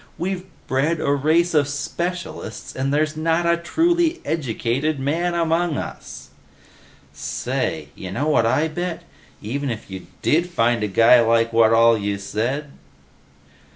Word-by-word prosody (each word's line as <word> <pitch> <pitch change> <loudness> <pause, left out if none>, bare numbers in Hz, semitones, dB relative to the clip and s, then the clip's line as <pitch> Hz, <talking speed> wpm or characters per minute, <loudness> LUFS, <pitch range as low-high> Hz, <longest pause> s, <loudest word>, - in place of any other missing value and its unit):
We've 185 0 -3 0.2
bred 150 +5 0
a 140 - 0
race 160 +5 +2
of 145 -3 +3
specialists 155 -4 -5
and 135 +1 -1
there's 155 +1 +1
not 165 +2 +1
a 170 0 +4
truly 335 - +1
educated 140 0 -1
man 165 +6 -1
among 165 -1 +1
us!" - - -8 0.8
"Say, - - -3
you 95 - -8
know 140 +11 -2
what 140 -7 +3
I 150 +7 +2
bet? 175 +2 -4 0.4
Even 135 +6 -3
if 110 -4 -6
you 95 -1 -8 0.2
did 170 +3 +2
find 120 -7 +1
a - - +1
guy 115 +5 +6
who's 115 - +2
like 115 0 +2
what 115 -1 +5
all 115 0 +5
you 100 -2 -2
said 125 +9 -3
145 Hz, 150 wpm, -22 LUFS, 115-170 Hz, 0.8 s, guy